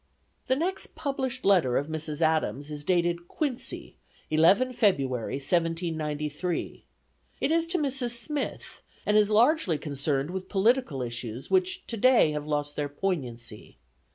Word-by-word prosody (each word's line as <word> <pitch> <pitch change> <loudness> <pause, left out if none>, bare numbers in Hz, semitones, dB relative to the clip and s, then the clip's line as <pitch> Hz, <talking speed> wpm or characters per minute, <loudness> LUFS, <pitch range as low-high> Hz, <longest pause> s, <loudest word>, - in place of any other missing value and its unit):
The 260 - +3
next 360 +7 -2
published 265 -3 -3
letter 175 -11 +4
of 140 - 0
Mrs. 155 -1 -4
Adams 155 -2 +1
is 145 -1 -6
dated 175 0 0
Quincy, 270 - -4 0.3
11 190 +12 +4
February, 140 - +1
1793. 160 +1 -2 0.6
It - - 0
is 330 0 +2
to 360 +2 +1
Mrs. 265 -6 0
Smith, 295 +4 -4 0.2
and 210 - +2
is 210 -1 +5
largely 220 - +3
concerned 140 0 -2
with 190 0 -5
political 205 - +2
issues 120 0 -6
which 375 0 +1
today 235 -6 +4
have 150 0 -4
lost 145 -1 -2
their 145 -1 -2
poignancy. 125 - -4
170 Hz, 130 wpm, -27 LUFS, 145-245 Hz, 0.6 s, is